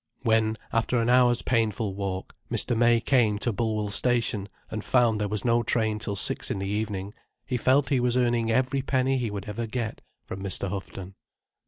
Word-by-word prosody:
When, 110 Hz, -1 st, +2 dB, 0.2 s
after 115 Hz, +2 st, +1 dB
an 115 Hz, +1 st, +2 dB
hour's 125 Hz, -1 st, +4 dB
painful 110 Hz, -3 st, 0 dB
walk, 95 Hz, -1 st, -4 dB, 0.2 s
Mr. 120 Hz, -, +1 dB
May 120 Hz, 0 st, +4 dB
came 115 Hz, -6 st, +2 dB
to 115 Hz, +2 st, -1 dB
Bullwell 110 Hz, -1 st, -1 dB
Station 110 Hz, -3 st, 0 dB, 0.2 s
and 110 Hz, -1 st, -4 dB
found 115 Hz, -4 st, +2 dB
there 105 Hz, -, 0 dB
was 105 Hz, +2 st, -3 dB
no 120 Hz, 0 st, +3 dB
train 110 Hz, -2 st, 0 dB
till 105 Hz, -1 st, -3 dB
six 95 Hz, -, +1 dB
in -, -, -2 dB
the 95 Hz, -, -3 dB
evening, 105 Hz, -1 st, -3 dB, 0.3 s
he 125 Hz, -, -2 dB
felt 130 Hz, +3 st, +2 dB
he 135 Hz, -, +2 dB
was 125 Hz, 0 st, +1 dB
earning 120 Hz, -2 st, +1 dB
every 130 Hz, +3 st, +1 dB
penny 130 Hz, 0 st, +1 dB
he 120 Hz, -3 st, -2 dB
would 100 Hz, -1 st, -5 dB
ever 115 Hz, +2 st, -4 dB
get 115 Hz, -1 st, -4 dB, 0.2 s
from 95 Hz, -, -7 dB
Mr. 100 Hz, 0 st, -1 dB
Houghton. 95 Hz, -1 st, -7 dB
115 Hz, 190 wpm, -26 LUFS, 105-120 Hz, 0.3 s, hour's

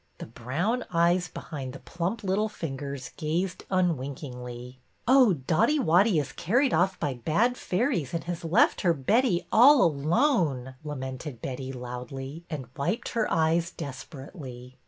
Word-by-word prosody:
The -, -, -7 dB
brown 150 Hz, -, -2 dB
eyes 175 Hz, +1 st, +3 dB
behind 135 Hz, -5 st, -7 dB
the 140 Hz, -, -9 dB
plump 185 Hz, +6 st, -3 dB
little 200 Hz, +3 st, +1 dB
fingers 140 Hz, -7 st, -6 dB
gazed 170 Hz, +4 st, -2 dB
unwinkingly. 130 Hz, -7 st, -3 dB, 0.3 s
Oh, 255 Hz, -5 st, +6 dB
Dotty 160 Hz, -, +2 dB
Wotty 190 Hz, -, +4 dB
is 145 Hz, -, -3 dB
carried 245 Hz, -, +1 dB
oif 180 Hz, +3 st, +2 dB
by 145 Hz, -4 st, -1 dB
bad 170 Hz, -, +1 dB
fairies 185 Hz, -, -1 dB
and 165 Hz, -, -2 dB
has 170 Hz, -1 st, -5 dB
left 170 Hz, +8 st, +3 dB
her 175 Hz, -4 st, +3 dB
Betty 195 Hz, -, +2 dB
all 260 Hz, +4 st, +7 dB
alone," 155 Hz, -, +1 dB
lamented 130 Hz, -2 st, -6 dB
Betty, 130 Hz, +1 st, -5 dB
loudly, 130 Hz, +4 st, -7 dB
and 150 Hz, -6 st, -4 dB
wiped 215 Hz, -, -2 dB
her 225 Hz, -2 st, -1 dB
eyes 165 Hz, +1 st, +2 dB
desperately. 135 Hz, -4 st, -9 dB
160 Hz, 135 wpm, -27 LUFS, 135-190 Hz, 0.3 s, all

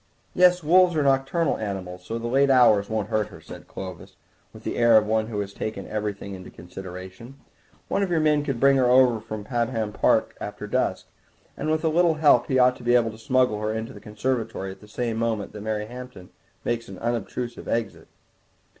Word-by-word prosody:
"Yes, 180 Hz, -1 st, +4 dB
wolves 175 Hz, +2 st, +5 dB
are 150 Hz, -, +2 dB
nocturnal 135 Hz, +4 st, +1 dB
animals, 95 Hz, -4 st, -5 dB
so 115 Hz, -, -4 dB
the 115 Hz, -, -6 dB
late 135 Hz, +4 st, +3 dB
hours 110 Hz, -6 st, +5 dB
won't 110 Hz, -2 st, -2 dB
hurt 110 Hz, -1 st, 0 dB
her," -, -, -13 dB
said -, -, -12 dB
Clovis, 95 Hz, -2 st, -9 dB, 0.4 s
with -, -, -14 dB
the -, -, -3 dB
air 120 Hz, -1 st, +6 dB
of 105 Hz, -, +3 dB
one 110 Hz, 0 st, 0 dB
who 110 Hz, -3 st, -4 dB
has 100 Hz, 0 st, -6 dB
taken 110 Hz, -3 st, -5 dB
everything 105 Hz, -2 st, -4 dB
into 95 Hz, -1 st, -9 dB
consideration; 95 Hz, +7 st, -10 dB, 0.5 s
"one -, -, 0 dB
of 195 Hz, -, 0 dB
your 170 Hz, -2 st, +2 dB
men 150 Hz, -1 st, +2 dB
could 135 Hz, -5 st, -3 dB
bring 140 Hz, +1 st, +5 dB
her 125 Hz, -2 st, +3 dB
over 125 Hz, -2 st, +5 dB
from 110 Hz, 0 st, -7 dB
Pabham 115 Hz, -2 st, -2 dB
Park -, -, +2 dB
after -, -, -6 dB
dusk, -, -, -1 dB, 0.5 s
and -, -, -3 dB
with 155 Hz, +1 st, 0 dB
a -, -, +2 dB
little 170 Hz, 0 st, +3 dB
help 150 Hz, -6 st, +4 dB
he 130 Hz, -, +1 dB
ought 125 Hz, 0 st, +4 dB
to -, -, -13 dB
be 120 Hz, +1 st, +3 dB
able 115 Hz, -2 st, +3 dB
to 110 Hz, -, -12 dB
smuggle 125 Hz, -2 st, +1 dB
her 110 Hz, 0 st, -1 dB
into 110 Hz, +1 st, -5 dB
the 105 Hz, -, -12 dB
conservatory 105 Hz, -2 st, -3 dB
at 95 Hz, -, -13 dB
the 105 Hz, -, -14 dB
same 115 Hz, +1 st, -3 dB
moment 115 Hz, -3 st, -2 dB
that 105 Hz, -, -8 dB
Mary 105 Hz, 0 st, -2 dB
Hampton 125 Hz, -5 st, -10 dB, 0.3 s
makes 115 Hz, -1 st, -2 dB
an 95 Hz, -, -9 dB
unobtrusive 120 Hz, +2 st, -4 dB
exit." 115 Hz, -1 st, -3 dB
115 Hz, 205 wpm, -25 LUFS, 105-130 Hz, 0.5 s, air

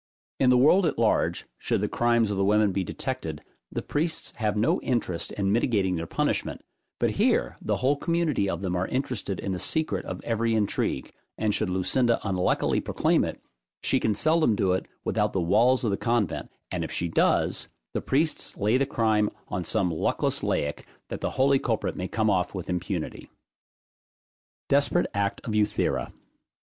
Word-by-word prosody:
In 130 Hz, -, +4 dB
the 125 Hz, -, +6 dB
world 165 Hz, +8 st, +5 dB
at 150 Hz, -, -2 dB
large, 115 Hz, -1 st, +1 dB
should -, -, 0 dB
the -, -, 0 dB
crimes 120 Hz, -2 st, +2 dB
of 100 Hz, -, -2 dB
the 100 Hz, -, +2 dB
women 105 Hz, +1 st, +3 dB
be 95 Hz, 0 st, -1 dB
detected, -, -, -4 dB, 0.3 s
the -, -, -3 dB
priests 160 Hz, +2 st, -2 dB
have 105 Hz, -2 st, 0 dB
no 110 Hz, -, +2 dB
interest 100 Hz, -9 st, -1 dB
in 100 Hz, -1 st, 0 dB
mitigating 100 Hz, -5 st, +2 dB
their 85 Hz, 0 st, -4 dB
punishment; -, -, -1 dB, 0.3 s
but -, -, +1 dB
here -, -, +1 dB
the -, -, 0 dB
whole 135 Hz, +3 st, +2 dB
community 160 Hz, -, 0 dB
of 85 Hz, -1 st, -3 dB
them 90 Hz, -2 st, -1 dB
are 90 Hz, +1 st, 0 dB
interested 125 Hz, -7 st, -2 dB
in 100 Hz, -, -3 dB
the 90 Hz, -, -2 dB
secret 130 Hz, -, 0 dB
of 95 Hz, -, -5 dB
every 115 Hz, 0 st, 0 dB
intrigue, 105 Hz, -10 st, -1 dB, 0.2 s
and 105 Hz, -1 st, +1 dB
should 105 Hz, -2 st, -1 dB
Lucinda 115 Hz, +6 st, +2 dB
unluckily 90 Hz, -2 st, +1 dB
proclaim -, -, +1 dB
it, -, -, -5 dB, 0.4 s
she -, -, +2 dB
can 110 Hz, -, +1 dB
seldom 155 Hz, -2 st, +3 dB
do 95 Hz, -2 st, +1 dB
it 95 Hz, -, -1 dB, 0.2 s
without -, -, 0 dB
the 95 Hz, -, +1 dB
walls 120 Hz, +9 st, +3 dB
of 110 Hz, -, +1 dB
the 100 Hz, -, 0 dB
convent, 115 Hz, -6 st, -1 dB, 0.2 s
and -, -, -2 dB
if -, -, -5 dB
she 85 Hz, -, -1 dB
does, 80 Hz, -, +1 dB, 0.3 s
the -, -, -1 dB
priests 155 Hz, +4 st, -1 dB
lay 105 Hz, +4 st, +2 dB
the 135 Hz, -, +1 dB
crime 110 Hz, -5 st, +2 dB, 0.2 s
on 90 Hz, -, -2 dB
some 95 Hz, -2 st, 0 dB
luckless 80 Hz, -, 0 dB
laic, 75 Hz, 0 st, -2 dB, 0.2 s
that -, -, -5 dB
the -, -, 0 dB
holy 135 Hz, +1 st, +3 dB
culprit 115 Hz, -5 st, -1 dB
may 90 Hz, -, -3 dB
come 110 Hz, +1 st, 0 dB
off 95 Hz, -2 st, +1 dB
with 90 Hz, -1 st, -4 dB
impunity. 90 Hz, -1 st, -4 dB, 1.4 s
DESPERATE 145 Hz, +5 st, +3 dB
ACT 100 Hz, 0 st, -1 dB
OF 110 Hz, -, -4 dB
EUTHIRA. 105 Hz, -1 st, 0 dB
105 Hz, 180 wpm, -26 LUFS, 95-125 Hz, 1.4 s, the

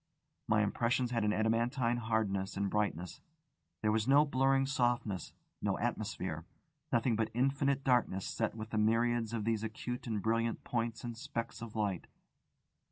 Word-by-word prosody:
My 105 Hz, 0 st, +4 dB
impressions 120 Hz, +4 st, +1 dB
had 115 Hz, -3 st, +1 dB
an 105 Hz, -, +2 dB
adamantine 115 Hz, +3 st, +1 dB
hardness 105 Hz, -4 st, -1 dB
and 100 Hz, -1 st, 0 dB
brightness: 95 Hz, -4 st, -1 dB, 0.6 s
there 105 Hz, -, +3 dB
was 110 Hz, +1 st, +1 dB
no 145 Hz, +2 st, +6 dB
blurring 135 Hz, -1 st, +3 dB
softness, 120 Hz, -7 st, 0 dB, 0.3 s
no -, -, 0 dB
atmosphere, -, -, -2 dB, 0.5 s
nothing 115 Hz, 0 st, +2 dB
but 110 Hz, 0 st, 0 dB
infinite 135 Hz, +2 st, +1 dB
darkness 120 Hz, -7 st, +2 dB
set 110 Hz, -1 st, -1 dB
with 110 Hz, 0 st, -7 dB
the 110 Hz, -, +1 dB
myriads 115 Hz, +1 st, +2 dB
of 115 Hz, -3 st, -2 dB
these 110 Hz, -1 st, 0 dB
acute 120 Hz, +3 st, -4 dB
and 110 Hz, -2 st, -1 dB
brilliant 115 Hz, +2 st, 0 dB
points 115 Hz, -1 st, -2 dB
and 120 Hz, -1 st, -4 dB
specks 115 Hz, -3 st, -5 dB
of 115 Hz, -2 st, -7 dB
light. 100 Hz, -5 st, -1 dB
115 Hz, 155 wpm, -34 LUFS, 110-120 Hz, 0.6 s, no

